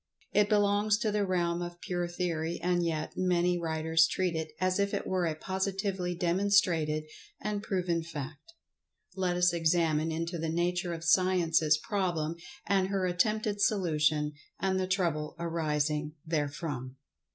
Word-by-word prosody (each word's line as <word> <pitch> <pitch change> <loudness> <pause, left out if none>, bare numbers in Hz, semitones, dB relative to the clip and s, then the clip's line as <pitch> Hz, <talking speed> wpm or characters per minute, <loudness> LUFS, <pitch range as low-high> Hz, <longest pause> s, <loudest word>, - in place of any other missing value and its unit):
It 210 0 +4
belongs 205 0 +3
to 220 -1 0
the 205 -1 0
realm 175 -2 0
of 175 0 -6
pure 175 -1 -2
theory, 170 -2 -2
and 175 0 +1
yet, 160 -2 -2
many 180 -1 +2
writers 160 0 +2
treat 180 -3 -1
it 160 -1 -3
as 185 +1 +1
if 200 0 +1
it - - -3
were 185 -2 0
a 155 - -1
positively 190 0 -2
demonstrated 175 -4 +2 0.4
and 210 -1 -2
proven 180 -5 -1
fact. 155 - -8 0.6
Let 180 -2 0
us 180 0 +4
examine 165 -1 +2
into 165 +2 -3
the 160 0 -2
nature 175 +1 0
of 165 - -8
Science's 165 -3 +3
problem, 175 -6 -1 0.3
and 195 -1 +2
her 195 -1 0
attempted 205 +3 0
solution, 155 -7 +2 0.3
and 190 -1 +1
the 185 - -1
trouble 170 -6 -1
arising 150 -2 -1
therefrom. 145 -4 -3
175 Hz, 145 wpm, -30 LUFS, 160-190 Hz, 0.6 s, It